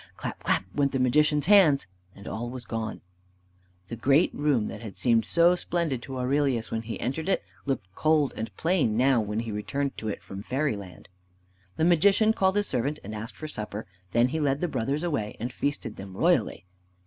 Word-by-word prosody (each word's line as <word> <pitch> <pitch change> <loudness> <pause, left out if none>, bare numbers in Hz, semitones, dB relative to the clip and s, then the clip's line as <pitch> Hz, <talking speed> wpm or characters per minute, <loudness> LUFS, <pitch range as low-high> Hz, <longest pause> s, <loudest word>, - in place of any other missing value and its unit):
Clap! - - -5
clap! - - +1
went 140 -1 +1
the 135 - 0
Magician's 150 +3 +3
hands, 180 -8 +6 0.3
and 100 - -12
all 115 +4 -4
was 125 0 -7
gone. 115 -1 -4 0.9
The 115 - -5
great 135 +8 +3
room 140 -7 +1
that - - -7
had 110 -4 -8
seemed 115 -3 +2
so 170 +7 +4
splendid 170 -7 -1
to 135 +1 -7
Aurelius 130 -2 0
when 115 - -1
he 115 0 -6
entered 155 +8 -2
it, - - +1 0.2
looked 135 -7 -1
cold 155 +2 +2
and 110 - -4
plain 160 - +1
now 130 -1 +4
when 105 +1 -2
he 115 -1 -5
returned 105 +7 -2
to 110 - -5
it 105 - -4
from 95 0 -8
fairyland. 105 - -3 0.7
The 160 - +1
Magician 200 +6 +4
called 190 -3 +2
his 205 0 +2
servant 140 - -1
and 105 - -7
asked 110 +2 -6
for 155 - -7
supper. 105 -6 -5 0.3
Then 120 +4 +3
he 160 +4 -2
led 140 -2 +1
the 175 - 0
brothers 140 +2 -2
away 125 -12 -2
and 120 +2 -4
feasted 140 -7 -3
them 95 -1 -9
royally. - - +1
130 Hz, 195 wpm, -27 LUFS, 110-150 Hz, 0.9 s, hands